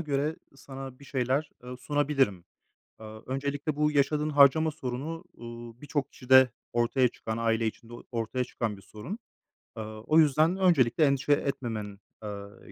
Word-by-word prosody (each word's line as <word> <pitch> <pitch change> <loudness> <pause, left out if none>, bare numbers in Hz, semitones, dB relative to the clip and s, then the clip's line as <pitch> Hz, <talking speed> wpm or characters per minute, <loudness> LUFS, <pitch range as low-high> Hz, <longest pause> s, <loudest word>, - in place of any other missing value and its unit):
göre 150 0 -1 0.2
sana 135 -1 -9
bir 140 - -14
şeyler, 135 +3 -1
ııı, 125 0 -7
sunabilirim. 135 - 0 0.5
Aaa, 110 0 -10
öncelikle 140 +3 -2
bu 150 0 +2
yaşadığın 150 +1 +1
harcama 145 +2 +5
sorunu, 150 +3 -5
uuu, 120 0 -10
birçok 145 -1 -2
kişide 130 0 +5 0.2
ortaya 120 +2 +3
çıkan, 110 -1 -5
aile 115 0 +1
içinde 115 +1 -6
o 120 - -9
ortaya 120 +2 -1
çıkan 115 -4 -3
bir 100 - -15
sorun. 110 - -8 0.6
Aaa, 110 -1 -7
o 155 +8 +4
yüzden 155 +4 +4
öncelikle 160 -7 +4
endişe 140 +1 +2
etmemen, 115 -8 -3 0.2
eee, 100 -1 -8
130 Hz, 145 wpm, -28 LUFS, 115-145 Hz, 0.6 s, harcama